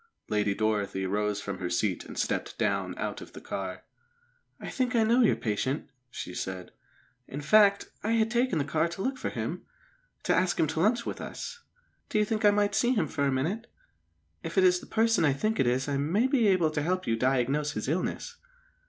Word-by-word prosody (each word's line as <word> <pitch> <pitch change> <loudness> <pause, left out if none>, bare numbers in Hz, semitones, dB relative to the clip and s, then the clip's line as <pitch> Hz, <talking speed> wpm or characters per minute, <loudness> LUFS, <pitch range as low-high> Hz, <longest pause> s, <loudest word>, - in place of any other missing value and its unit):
Lady 105 -1 +1
Dorothy 105 -3 0
rose 105 +1 -1
from 100 -2 -5
her 90 - -3
seat 90 +1 0
and - - -10
stepped - - -2
down - - -1
out - - -3
of - - -11
the - - -8
car. 95 -1 -5 0.8
"I - - -7
think 250 -1 -1
I 225 - +4
know 235 +3 +4
your 230 - +4
patient," 130 +7 -2 0.2
she 90 - -7
said. 95 -1 -5 0.6
"In 140 - -6
fact, 200 +5 +4
I 220 +2 0
had 225 0 +2
taken 240 -5 +1
the 145 - 0
car 155 +3 +1
to 170 +3 -5
look 260 0 -2
for - - -2
him, - - -4 0.6
to - - +2
ask 185 -1 +1
him - - +4
to 160 +1 -3
lunch 230 +6 +2
with - - -4
us. 480 - -6 0.5
Do - - 0
you 210 - +3
think 220 +1 -2
I 205 - +7
might 205 0 +2
see 245 +1 +3
him 170 -8 +1
for 140 0 -1
a - - +1
minute? 170 - -1 0.7
If - - -6
it 190 - +6
is 180 -1 +5
the - - -13
person 225 -5 +2
I 145 -3 +4
think 215 +11 -1
it 125 - +3
is 130 +3 +1
I 140 -1 0
may 170 - +1
be 260 -5 +3
able 180 -5 +3
to 150 - -1
help 185 +4 -1
you 115 - +1
diagnose 135 +4 +1
his 110 - -4
illness." 185 - -2
160 Hz, 215 wpm, -28 LUFS, -, 0.8 s, I